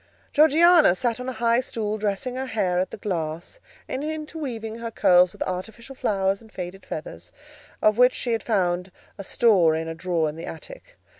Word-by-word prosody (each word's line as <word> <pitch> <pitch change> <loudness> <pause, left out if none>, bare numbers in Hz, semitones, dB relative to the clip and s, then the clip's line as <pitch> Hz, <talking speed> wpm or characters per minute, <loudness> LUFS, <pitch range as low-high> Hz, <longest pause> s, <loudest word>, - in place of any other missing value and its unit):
Georgiana 315 - +6
sat 235 +5 -1
on 250 +1 -4
a - - -4
high 235 0 +2
stool, 215 -4 -3
dressing 210 +4 -2
her 260 +1 -4
hair 185 -7 0
at 185 - -1
the - - -8
glass, 170 - -4 0.3
and 270 - -4
interweaving 295 -8 -5
her 230 0 -4
curls 180 -5 +4
with - - -4
artificial 220 +8 -6
flowers 195 -5 0
and 220 -1 -17
faded 185 +1 -8
feathers, - - -7 0.5
of 215 +2 +3
which 250 0 +5
she 240 - -2
had 225 - 0
found 180 -4 0 0.3
a - - -5
store 190 - +3
in 160 0 -3
a 165 - -4
drawer 165 -1 -1
in 150 - -5
the 165 - -7
attic. 160 -2 -11
215 Hz, 190 wpm, -24 LUFS, 180-250 Hz, 0.5 s, Georgiana